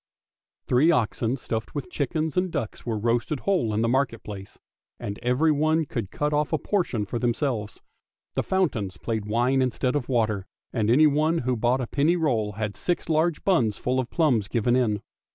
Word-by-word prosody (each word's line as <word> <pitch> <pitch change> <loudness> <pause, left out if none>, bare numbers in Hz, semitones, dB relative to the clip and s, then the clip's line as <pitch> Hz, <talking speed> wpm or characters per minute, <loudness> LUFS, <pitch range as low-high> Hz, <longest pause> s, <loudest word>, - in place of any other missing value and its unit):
Three 130 +6 +4
oxen 120 -3 +1
stuffed 110 -1 -4
with 145 +5 -4
chickens 155 +1 -1
and 180 0 +1
ducks 130 -7 -4
were 115 -2 0
roasted 120 +6 0
whole 185 - +1
in 105 +2 0
the - - +2
market 130 -2 0
place, 100 -1 -9 0.4
and 100 0 -5
everyone 155 +5 +2
could 115 -9 -4
cut 150 +5 -1
off 150 0 +1
a 160 - +2
portion 145 - -1
for 115 +4 -3
themselves. 120 -3 -1 0.5
The - - 0
fountains 115 - -1
played 110 0 -3
wine 120 +5 +2
instead 125 +1 0
of 140 -4 -2
water, 110 -6 0 0.3
and 110 -3 0
anyone 155 +5 +4
who 130 -1 +1
bought 120 +3 +1
a - - -1
penny 150 +8 +2
roll 120 -11 0
had 105 -1 -3
six 175 - -2
large 160 0 +1
buns 120 - +2
full 130 +1 0
of 130 - -2
plums 125 - +2
given 120 +2 +1
in. 110 -5 +1
125 Hz, 180 wpm, -25 LUFS, 110-150 Hz, 0.5 s, Three